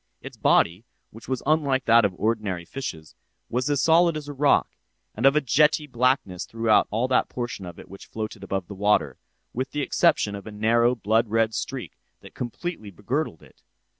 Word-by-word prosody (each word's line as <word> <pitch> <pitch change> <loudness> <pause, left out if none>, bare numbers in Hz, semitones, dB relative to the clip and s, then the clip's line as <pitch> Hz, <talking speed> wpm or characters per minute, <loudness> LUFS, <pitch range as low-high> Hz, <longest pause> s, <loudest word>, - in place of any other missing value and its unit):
Its - - -10
body, 90 +6 +2 0.3
which 115 - -13
was 130 -2 -2
unlike 140 -3 +1
that 115 0 +6
of 100 -3 0
ordinary 105 -6 -2
fishes, 80 - -7 0.4
was 125 +4 -1
as 145 -2 +1
solid 165 0 +4
as 150 -1 -8
a 145 - -6
rock, 145 +1 +3 0.4
and 120 +5 +2
of 135 - +4
a 150 - +4
jetty 150 +4 +3
blackness 125 -8 0
throughout 115 -1 +2
all 115 +4 0
that 130 -1 +1
portion 120 -6 -5
of 85 - -10
it - - -12
which 100 +1 -12
floated 110 -2 -6
above 95 -1 -3
the 105 - -8
water, 105 +2 +1 0.3
with 130 +2 -3
the 150 - -3
exception 140 -8 +2
of 100 +1 -8
a - - -7
narrow 115 +3 +2
blood 110 +1 +1
red 110 +1 +1
streak - - -5 0.2
that - - -14
completely 125 - -5
begirdled 105 - -3
it. - - -21
115 Hz, 190 wpm, -24 LUFS, 105-135 Hz, 0.4 s, that